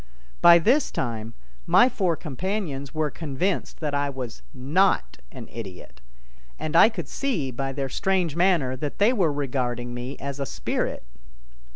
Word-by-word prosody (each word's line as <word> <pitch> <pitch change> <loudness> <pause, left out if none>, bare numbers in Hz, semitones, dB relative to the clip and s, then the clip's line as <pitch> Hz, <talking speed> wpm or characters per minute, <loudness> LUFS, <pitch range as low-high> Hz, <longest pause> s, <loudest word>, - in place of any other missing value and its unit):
By 170 0 +9
this 250 - +3
time 115 -2 -4 0.3
my 245 - +6
four 185 -9 0
companions 155 -3 -4
were 155 -2 -1
convinced 165 +7 -2
that 150 -2 -2
I 145 0 +1
was 125 - -6
not 140 - +1
an - - -9
idiot, 95 - -9 0.6
and 155 - -4
I 190 - +8
could 175 - -6
see 185 - -2
by 135 +2 -3
their 135 0 -3
strange 180 +1 0
manner 170 -8 +2
that 145 +2 -5
they 215 +5 +4
were 180 -10 +2
regarding 125 -4 -2
me 125 +3 -6
as 140 0 -5
a 140 - -2
spirit. 60 - -2
145 Hz, 155 wpm, -25 LUFS, 130-180 Hz, 0.6 s, By